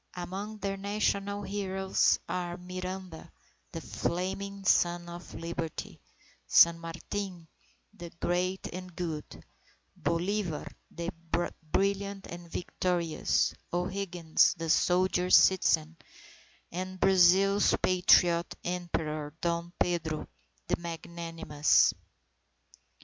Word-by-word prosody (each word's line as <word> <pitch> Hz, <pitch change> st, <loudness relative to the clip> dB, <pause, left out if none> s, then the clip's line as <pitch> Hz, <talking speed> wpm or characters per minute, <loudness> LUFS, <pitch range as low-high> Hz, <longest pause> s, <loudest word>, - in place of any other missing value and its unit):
Among 195 Hz, +4 st, -5 dB
their 195 Hz, -1 st, -3 dB
national 200 Hz, 0 st, -1 dB
heroes, 190 Hz, -1 st, +1 dB
are 175 Hz, -1 st, -3 dB
Miranda 185 Hz, -1 st, -7 dB, 0.4 s
"the -, -, -5 dB
Flaming 195 Hz, +2 st, -3 dB
Son 175 Hz, -1 st, +3 dB
of 175 Hz, +1 st, -9 dB
Liberty," 165 Hz, -1 st, -5 dB, 0.5 s
San 170 Hz, 0 st, +6 dB
Martin 170 Hz, +1 st, -5 dB, 0.5 s
the 175 Hz, -5 st, -9 dB
great 180 Hz, +2 st, -1 dB
and 185 Hz, -1 st, -8 dB
good, 160 Hz, -3 st, -5 dB, 0.5 s
Bolivar 175 Hz, -1 st, -1 dB, 0.2 s
the 170 Hz, +1 st, -4 dB, 0.6 s
brilliant 200 Hz, 0 st, 0 dB
and 175 Hz, 0 st, -9 dB
victorious, 175 Hz, -2 st, 0 dB, 0.2 s
O'Higgins 180 Hz, -2 st, +1 dB
the 165 Hz, -1 st, -1 dB
soldier 180 Hz, +1 st, +2 dB
citizen, 165 Hz, -4 st, +5 dB, 0.8 s
and 185 Hz, +2 st, -5 dB
Brazil's 195 Hz, +2 st, +5 dB
patriot 175 Hz, -2 st, +4 dB
Emperor, 155 Hz, -4 st, -3 dB
Dom 170 Hz, 0 st, -1 dB
Pedro 165 Hz, -3 st, -1 dB, 0.4 s
the -, -, +1 dB
magnanimous. 165 Hz, -3 st, +1 dB
180 Hz, 90 wpm, -30 LUFS, 170-190 Hz, 0.8 s, San